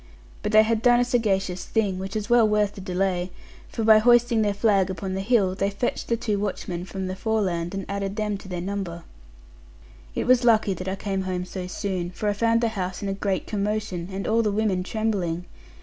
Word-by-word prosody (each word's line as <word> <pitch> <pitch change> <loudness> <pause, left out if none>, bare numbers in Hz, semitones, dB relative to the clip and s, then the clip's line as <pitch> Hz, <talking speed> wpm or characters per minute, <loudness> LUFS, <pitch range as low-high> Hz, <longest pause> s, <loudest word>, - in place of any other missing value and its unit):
But 210 - -2
they 215 0 +7
had 220 0 0
done 240 0 +5
a 245 - +3
sagacious 195 -7 0
thing, 200 -5 0
which 190 +2 -5
was 215 -1 -2
well 240 -2 +5
worth 210 -1 +1
the 195 - -9
delay; 185 -1 -1 0.4
for 225 - -3
by 220 0 +7
hoisting 240 0 +4
their 210 -1 +2
flag 200 -3 +2
upon 190 0 -4
the 190 - -2
hill, 200 -3 +2
they 195 +1 0
fetched 200 +5 -3
the 235 - +1
two 210 -3 -1
watchmen 185 -3 -3
from 190 +1 -5
the 185 0 -3
Foreland, 190 -5 -1
and 195 - -4
added 200 0 -3
them 210 -1 -1
to - - -12
their 180 -2 -4
number. 185 -3 -4 1.1
It - - -1
was 250 0 +4
lucky 220 -4 +4
that 185 +1 -7
I 190 - -1
came 195 -1 -2
home 185 -1 -3
so 180 0 -6
soon; 185 -2 -3
for 195 +4 -4
I 205 - +2
found 230 +2 +2
the 230 - +2
house 185 -3 -4
in 200 - -2
a - - 0
great 195 -1 -2
commotion, 205 -4 -2
and 195 +1 -4
all 225 +1 +3
the 215 -2 +1
women 200 -3 +1
trembling. 185 -4 -2
200 Hz, 220 wpm, -25 LUFS, 185-220 Hz, 1.1 s, they